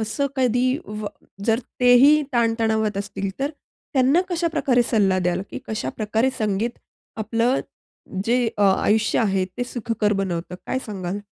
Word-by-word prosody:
असं 220 +6 -1
कधी 255 0 +2
व 210 0 -6 0.4
जर 225 0 +3 0.2
तेही 255 +5 +6
ताण 235 -2 +2
तणावात 220 -2 +1
असतील 195 -1 -3
तर 280 +2 -1 0.4
त्यांना 270 +5 +4
कशाप्रकारे 320 -8 +1
सल्ला 205 -6 +2
द्याल 180 0 0
की - - -5
कशाप्रकारे 220 - -1
संगीत 215 +2 -1 0.4
आपलं 230 +4 +1 0.6
जे 240 +2 +2
अ, 205 - +1
आयुष्य 210 +2 +3
आहे 195 -4 +2
ते 245 - -1
सुखकर 230 -3 -1
बनवतं, 180 -3 -2
काय 260 - -1
सांगाल? 190 -2 -4
220 Hz, 140 wpm, -23 LUFS, 200-250 Hz, 0.6 s, तेही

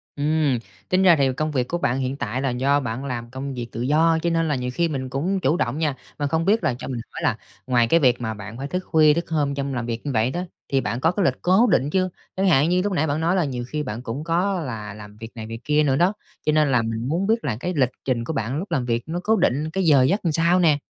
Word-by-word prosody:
Ừm, 145 -3 +1 0.3
tính 185 +1 +3
ra 175 -3 +7
thì 135 -3 +2
công 155 0 -1
việc 125 -3 0
của 175 - -2
bạn 130 -7 0
hiện 130 +1 -2
tại 120 0 -3
là 135 - 0
do 135 +4 +2
bạn 125 0 -4
làm 120 -3 -4
công 135 +2 -5
việc 120 -2 -5
tự 115 - -5
do, 160 +5 +3
cho 170 - +2
nên 165 -1 +1
là 150 - +1
nhiều 125 -1 -3
khi 170 +3 +1
mình 130 -4 -4
cũng 180 +9 -1
chủ 155 +1 +1
động 120 -1 -1
nha. 155 -4 0 0.2
Mà 145 - 0
không 160 +3 0
biết 215 +3 +2
là 125 - +2
cho - - -6
mình 125 -3 -4
hỏi - - -7
là - - +1 0.3
ngoài 120 -2 +3
cái 165 - +4
việc 125 -5 +3
mà 110 -2 -2
bạn 105 +2 -9
phải 135 +2 -4
thức 180 - -2
khuya 155 -2 +5
thức 170 +2 -3
hôm 145 -3 0
trong 140 -1 -3
làm 120 -1 -2
việc 115 +1 -4
như 145 - -1
vậy 115 +1 +1
đó, 175 - -3 0.3
thì 135 -1 +2
bạn 115 +3 -2
có 160 +5 +3
cái 190 0 0
lịch 135 - +3
cố 190 +7 +4
định 145 -7 +2
chưa? 185 +3 +1 0.3
Chẳng 195 +1 +1
hạn 155 -3 +4
như 180 +1 +2
lúc 205 0 -1
nãy 160 -3 +1
bạn 145 +2 -1
nói 170 +3 +2
là 180 -5 +2
nhiều 125 -3 -4
khi 150 +1 -3
bạn 115 -3 -5
cũng 130 +5 -5
có 180 +3 0
là 110 -8 -5
làm 105 0 -12
việc 115 +1 -9
này, 110 -2 -6
việc 115 0 -6
kia 150 +1 +2
nữa 135 -2 +2
đó, 175 +7 +3 0.3
cho 155 - +3
nên 150 -2 +3
là 125 -2 +3
mình 115 +1 -3
muốn 175 +7 0
biết 225 +1 +1
là 125 -7 -1
cái 180 +5 -3
lịch 130 -5 +3 0.2
trình 125 -3 0
của 160 - -4
bạn 130 +1 -2
lúc 180 +3 -5
làm 135 -7 0
việc 115 -1 -1
nó 170 +2 -3
cố 220 +3 +3
định 150 - +1
cái 190 +3 -1
giờ 145 -5 +5
giấc 170 +11 +2
làm 165 - +2
sao 170 +3 +3
nè? 155 -4 +4
145 Hz, 300 wpm, -23 LUFS, 125-165 Hz, 0.3 s, ra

